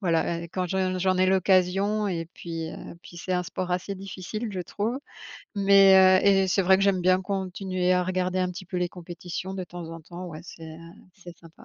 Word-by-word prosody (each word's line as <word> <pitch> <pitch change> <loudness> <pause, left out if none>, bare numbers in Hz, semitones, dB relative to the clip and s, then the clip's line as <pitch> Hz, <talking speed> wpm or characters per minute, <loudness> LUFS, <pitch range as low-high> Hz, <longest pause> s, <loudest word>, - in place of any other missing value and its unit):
voilà, 170 -2 0
heu, 170 - -8
quand 185 -1 -1
je 185 0 -1
j'en 185 0 +1
ai 185 0 +3
l'occasion 190 +2 +2
et 165 -3 -3
puis, 165 -1 -5
heu, - - -9
puis 175 - -13
c'est 185 +2 -4
un 180 0 0
sport 180 +1 -4
assez 180 +2 -2
difficile, 195 +3 -6
je 185 - -3
trouve. 210 +8 -3 0.6
Mais, 195 -2 +6
heu - - +2
et 195 -1 +4
c'est 195 +2 +2
vrai 190 +1 +5
que - - 0
j'aime 195 -2 +2
bien 185 +1 +4
continuer 185 -1 -1
à 180 0 +3
regarder 185 0 -1
un 185 -1 0
petit 185 +2 -8
peu 180 0 -4
les 180 0 0
compétitions, 175 +1 -7
de 190 - -4
temps 175 -2 -8
en 165 0 -8
temps, 175 +3 -9
ouais 155 -3 -8
c'est, 165 -1 -11
heu, 160 0 -10 0.4
c'est 175 -4 -13
sympa. 165 -1 -17
185 Hz, 220 wpm, -26 LUFS, 175-190 Hz, 0.6 s, Mais